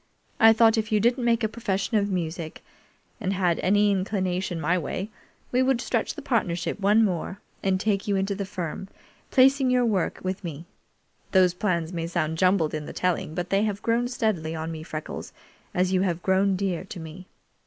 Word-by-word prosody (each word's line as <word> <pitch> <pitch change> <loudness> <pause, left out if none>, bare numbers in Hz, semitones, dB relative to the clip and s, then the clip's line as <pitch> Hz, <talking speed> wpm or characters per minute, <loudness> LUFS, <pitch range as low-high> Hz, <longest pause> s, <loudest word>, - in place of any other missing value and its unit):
I 225 0 +8
thought 225 0 +5
if 215 0 -3
you 215 - +3
didn't 240 +3 +2
make 235 0 +2
a - - +3
profession 215 -1 -1
of 205 0 +1
music, 170 -3 -4 0.6
and 195 -3 -1
had 180 -3 +1
any 205 +2 +3
inclination 185 -2 -1
my 165 +3 +1
way, 185 +5 -3 0.4
we 250 - +3
would 260 -1 +2
stretch - - -1
the - - -8
partnership 180 -8 -1
one 210 +3 +4
more 190 +1 -3 0.2
and 190 -1 +1
take 205 +1 0
you 200 - +1
into 195 +1 0
the 200 0 -3
firm, 185 -1 -5 0.4
placing 270 0 +4
your 250 -1 +3
work 200 -6 0
with 185 +1 -3
me. 165 -1 -6 0.7
Those 185 -2 +5
plans 180 -3 -1
may 165 -1 -2
sound 160 -2 -1
jumbled 185 -4 +3
in 155 -1 -4
the - - -7
telling, 180 -3 -1
but 175 0 -3
they 195 +1 +3
have 210 -2 -2
grown 235 +1 +1
steadily 205 -10 -1
on 160 +1 -4
me, 160 -1 -6
Freckles, 155 -1 -6 0.4
as 185 +1 +1
you 185 - +3
have 175 -3 -1
grown 190 +1 +3
dear 185 -3 -2
to 185 -2 -9
me." 165 +3 -9
190 Hz, 195 wpm, -25 LUFS, 175-215 Hz, 0.7 s, I